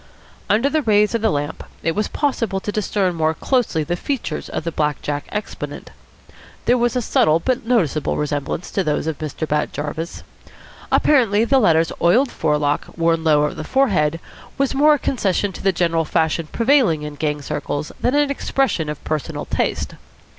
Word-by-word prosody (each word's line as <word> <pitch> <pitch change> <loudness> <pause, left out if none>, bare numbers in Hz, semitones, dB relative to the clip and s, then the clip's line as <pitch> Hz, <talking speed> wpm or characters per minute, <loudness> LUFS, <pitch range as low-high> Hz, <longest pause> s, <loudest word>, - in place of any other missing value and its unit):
Under 225 +6 +3
the 310 +2 +1
rays 210 -4 +3
of 230 - 0
the 220 - +3
lamp 145 -2 -3 0.2
it 165 - +1
was 210 +3 -1
possible 230 -9 -1
to 205 - -4
discern 200 -3 0
more 160 -1 0
closely 240 - 0
the 175 +4 -2
features 265 +7 -4
of - - -3
the 170 - -2
black 150 -2 -1
jack 145 -1 -3
exponent. 210 0 -6 0.7
There 245 - +4
was 240 +1 +1
a 250 - 0
subtle 155 -6 +3
but 255 +6 -1
noticeable 165 - +1
resemblance 150 +3 -3
to 195 - 0
those 150 -2 -1
of 160 -2 -3
Mr. 155 0 -4
Bat 150 0 0
Jarvis. 155 +3 -5 0.7
Apparently 230 -7 +4
the 270 +3 +4
latter's 165 -7 +3
oiled 240 +10 +4
forelock, 150 -2 0
worn 165 -1 +2
low 150 -2 +4
over 150 - 0
the - - -6
forehead, 170 - +1 0.4
was 275 -1 +1
more 300 +2 +5
a - - -2
concession 205 -7 0
to - - -9
the 195 - +3
general 165 -2 +1
fashion 160 0 0
prevailing 230 - +3
in 150 0 -5
gang 150 0 -2
circles 150 0 -3
than 250 - +1
an 290 -1 +3
expression 265 - 0
of 150 - -6
personal 155 -2 -3
taste. - - -1
170 Hz, 180 wpm, -20 LUFS, 155-235 Hz, 0.7 s, more